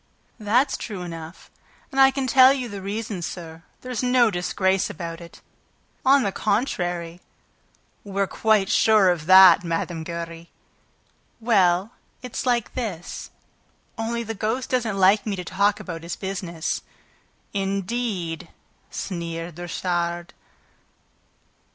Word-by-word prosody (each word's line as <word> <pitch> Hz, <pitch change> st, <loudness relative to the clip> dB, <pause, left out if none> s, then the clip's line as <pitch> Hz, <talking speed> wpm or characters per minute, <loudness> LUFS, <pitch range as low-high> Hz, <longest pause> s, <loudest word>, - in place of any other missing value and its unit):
"That's 245 Hz, +6 st, +2 dB
true 200 Hz, -5 st, -6 dB
enough... 165 Hz, -1 st, -9 dB, 0.4 s
And 270 Hz, -, +2 dB
I 270 Hz, -, +8 dB
can 270 Hz, 0 st, -2 dB
tell 260 Hz, +1 st, +7 dB
you 265 Hz, -3 st, -2 dB
the 200 Hz, -3 st, -7 dB
reason, 205 Hz, -1 st, -4 dB
sir. 165 Hz, -1 st, -7 dB, 0.2 s
There's 250 Hz, -3 st, -4 dB
no 250 Hz, -2 st, +4 dB
disgrace 190 Hz, +1 st, 0 dB
about 165 Hz, 0 st, -6 dB
it... 170 Hz, 0 st, -13 dB, 0.6 s
on 270 Hz, 0 st, +5 dB
the 200 Hz, -, 0 dB
contrary." 175 Hz, -6 st, -2 dB, 0.8 s
"We're 200 Hz, -1 st, -1 dB
quite 215 Hz, 0 st, +2 dB
sure 215 Hz, -4 st, +5 dB
of 165 Hz, -3 st, -4 dB
that, 185 Hz, -2 st, +8 dB
Mme. 170 Hz, 0 st, -2 dB
Giry!" 170 Hz, 0 st, -7 dB, 0.9 s
"Well, 195 Hz, -3 st, +2 dB, 0.3 s
it's 250 Hz, +1 st, -5 dB
like 240 Hz, -2 st, +1 dB
this... 195 Hz, -9 st, -5 dB, 0.7 s
only 235 Hz, +1 st, -2 dB
the 225 Hz, 0 st, -4 dB
ghost 225 Hz, +5 st, -2 dB
doesn't 230 Hz, -5 st, 0 dB
like 195 Hz, +3 st, +4 dB
me 205 Hz, -, -1 dB
to 180 Hz, -1 st, -6 dB
talk 200 Hz, +3 st, +1 dB
about 165 Hz, -3 st, -6 dB
his 170 Hz, +1 st, -5 dB
business." 185 Hz, -4 st, -4 dB, 0.7 s
"Indeed?" 195 Hz, -3 st, -2 dB, 0.4 s
sneered 170 Hz, -2 st, -5 dB
Richard. 175 Hz, 0 st, -2 dB
195 Hz, 120 wpm, -24 LUFS, 175-225 Hz, 0.9 s, I